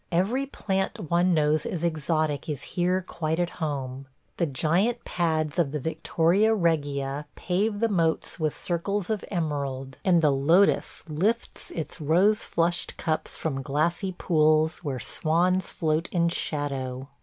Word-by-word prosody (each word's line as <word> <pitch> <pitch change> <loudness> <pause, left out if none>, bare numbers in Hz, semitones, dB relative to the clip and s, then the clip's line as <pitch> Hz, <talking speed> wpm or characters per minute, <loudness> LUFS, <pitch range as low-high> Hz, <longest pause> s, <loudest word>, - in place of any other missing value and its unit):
Every 215 +11 +1
plant 190 - -2
one 175 +2 +3
knows 155 0 +2
as 180 -7 -4
exotic 155 -2 0
is 145 -3 -3
here 180 +1 +1
quite 160 -1 -2
at 175 -1 0
home 135 -3 -3
– - - -43
the 170 - +1
giant 175 - +1
pads 160 -3 0
of 165 -5 +3
the 150 - -2
Victoria 175 +8 +2
regia 145 -5 0
pave 205 +3 0
the 230 - +3
moats 165 -7 0
with 155 -2 -1
circles 190 +3 -2
of 215 - -1
emerald, 140 -6 -3
and 175 -3 +4
the 150 - +5
lotus 165 +9 +3
lifts 195 +10 -1
its 160 +1 -5
rose 185 +8 +3
flushed 170 +1 -1
cups 155 -2 -2
from 135 -4 -2
glassy 170 +8 0
pools 155 -2 +2
where 135 -5 -3
swans 175 +7 +1
float 160 +1 -1
in 170 -1 +2
shadow. 135 -5 -3
160 Hz, 145 wpm, -26 LUFS, 150-180 Hz, -, the